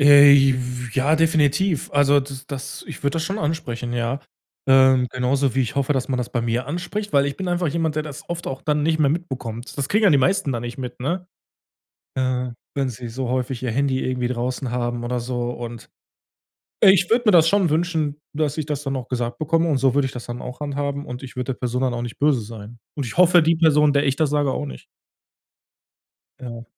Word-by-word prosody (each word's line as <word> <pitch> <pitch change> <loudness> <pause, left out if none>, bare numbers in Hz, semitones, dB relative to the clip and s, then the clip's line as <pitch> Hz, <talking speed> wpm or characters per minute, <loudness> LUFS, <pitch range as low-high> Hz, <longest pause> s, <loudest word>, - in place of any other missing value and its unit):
Äh, 145 0 +9
j 135 -1 +6
f 125 -2 -5
ja, 140 +4 +3
definitiv. 160 +1 +2
Also 145 0 +4
das 135 0 -8
das 140 -1 -7
ich - - -8
würde 140 0 +1
das 160 -1 -1
schon 195 +5 -3
ansprechen, 125 - -3
ja. 120 +3 -1 0.5
Ähm, 130 -1 +5
genauso 130 0 0
wie 135 - +2
ich 125 - -5
hoffe, 140 +1 +1
dass 130 -3 -2
man 130 - 0
das 125 - -3
bei 120 - 0
mir 120 +2 -1
anspricht, 180 +7 -4
weil 140 0 +4
ich 140 - -3
bin 190 -1 -4
einfach 175 -2 0
jemand, 160 0 -1
der 155 - +1
das 150 -3 -9
oft 170 0 -5
auch 135 - -5
dann 150 -1 0
nicht 160 +1 +1
mehr 145 -3 +3
mitbekommt. 130 -8 -5
Das 140 - -1
kriegen 210 +1 +2
ja 200 - +6
die 145 - +5
meisten 145 -1 +1
da 120 - -2
nicht 120 +1 -6
mit, 125 -2 -6
ne? 175 +7 -2 0.9
Äh, 125 -1 0 0.3
wenn 135 -2 0
sie 120 0 -7
so 125 +2 -4
häufig 130 0 -2
ihr 125 - -1
Handy 135 +2 0
irgendwie 125 -1 -1
draußen 125 +1 -3
haben 120 -1 -2
oder 125 0 -1
so. 120 0 -3
Und, 120 -1 -8 0.9
äh, - - +9
ich 180 -2 +3
würde 240 +2 +3
mir 210 - +6
das 165 -2 +6
schon 195 -2 +3
wünschen, 160 -2 0 0.2
dass 150 0 -1
ich 155 - -1
das 150 -1 -3
dann 135 -1 -2
auch 125 -2 -6
gesagt 120 -1 -3
bekomme 165 +2 +1
und 145 - +2
so 130 -1 +2
würde 140 -1 +2
ich - - -6
das 125 - -8
dann 120 0 -6
auch 125 +2 -8
handhaben, 140 0 -3
und 125 +1 -7
ich 130 -2 -10
würde 125 +1 -2
der - - -25
Person 125 0 -1
dann 130 -2 0
auch 120 - -3
nicht 120 -1 -7
böse 145 -4 +3
sein. 110 +1 -10 0.2
Und 145 - -2
ich 115 - -7
hoffe, 175 -1 +6
die 165 +2 +3
Person, 150 -2 +4
der 140 0 +2
ich 135 -1 +1
das 155 -2 +1
sage, 145 -2 +1
auch 75 - -3
nicht. 65 -2 -9 1.6
Ja. 120 -2 -7
135 Hz, 235 wpm, -22 LUFS, 125-150 Hz, 1.6 s, Äh